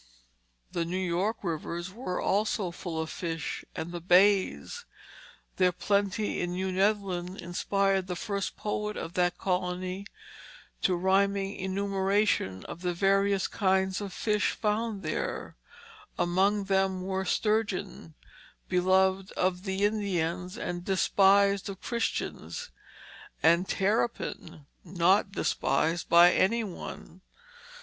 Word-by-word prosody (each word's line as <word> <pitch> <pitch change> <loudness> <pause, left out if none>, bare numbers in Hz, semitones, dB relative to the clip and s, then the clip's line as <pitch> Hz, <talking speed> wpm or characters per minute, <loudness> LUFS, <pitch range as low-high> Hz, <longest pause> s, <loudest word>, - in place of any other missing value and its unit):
The 170 - -1
New 175 +2 -3
York 185 +5 -1
rivers 170 +1 -4
were 205 -5 -4
also 205 -2 0
full 170 -2 -5
of 160 0 -3
fish, 165 -2 -4
and 165 - -4
the 175 -1 -5
bays; 195 - +3 0.7
their 185 -1 +4
plenty 200 +3 0
in 175 0 -2
New 190 +1 -2
Netherland 190 -2 0
inspired 195 +2 0
the 180 - -3
first 200 +1 -3
poet 210 0 -3
of 165 - -5
that 175 -1 +1
colony 185 +1 -2 0.7
to 185 - +2
rhyming 195 +2 +1
enumeration 195 - 0
of 175 - -8
the 180 -1 -1
various 195 +1 +2
kinds 190 -1 +1
of 200 -2 -5
fish 210 +2 0
found 215 -1 -1
there; 155 - -3 0.6
among 195 +4 +2
them 190 -1 +1
were 190 0 -2
sturgeon 200 -5 -1 0.5
beloved 190 +1 +2
of 185 +1 -1
the 190 +1 0
Indians 185 -3 -1
and 175 -6 -4
despised 200 +1 +3
of 195 -2 -7
Christians; 240 - -3 0.7
and 170 +3 +4
terrapin 195 -7 -1 0.2
not 185 +3 +2
despised 165 0 0
by 175 +1 +7
any 230 +4 +2
one. 185 -2 -8
190 Hz, 115 wpm, -29 LUFS, 180-200 Hz, 0.7 s, by